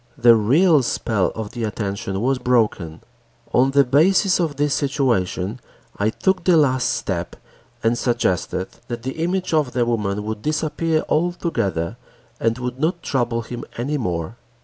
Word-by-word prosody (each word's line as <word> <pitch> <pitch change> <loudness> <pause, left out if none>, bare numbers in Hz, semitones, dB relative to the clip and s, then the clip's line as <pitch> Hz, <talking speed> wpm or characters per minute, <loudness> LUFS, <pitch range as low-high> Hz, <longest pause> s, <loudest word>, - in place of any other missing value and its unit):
The 120 -2 +7
real 145 - +4
spell 110 -5 0
of 110 -2 -5
the 120 - -5
attention 100 -2 -3
was 130 +2 +1
broken. 110 -10 0 0.5
On 130 +2 +4
the 140 +1 +5
basis 180 +9 +3
of 160 -4 0
this 145 0 +1
situation, 120 -7 0 0.4
I 105 +1 +1
took 185 - 0
the 175 -1 +4
last 130 -4 +2
step - - -3 0.5
and 115 +1 +3
suggested 95 -6 -1 0.2
that 120 -1 -5
the 130 +4 -5
image 185 0 -1
of 150 -5 +1
the 120 -2 +1
woman 105 -3 -1
would 110 0 -4
disappear 155 +2 0
altogether 155 - -1 0.4
and 115 +1 +1
would 125 0 -5
not 170 +3 -1
trouble 120 -3 -1
him 120 +1 -7
any 140 +5 -1
more. 90 0 -3
125 Hz, 150 wpm, -21 LUFS, 110-150 Hz, 0.5 s, The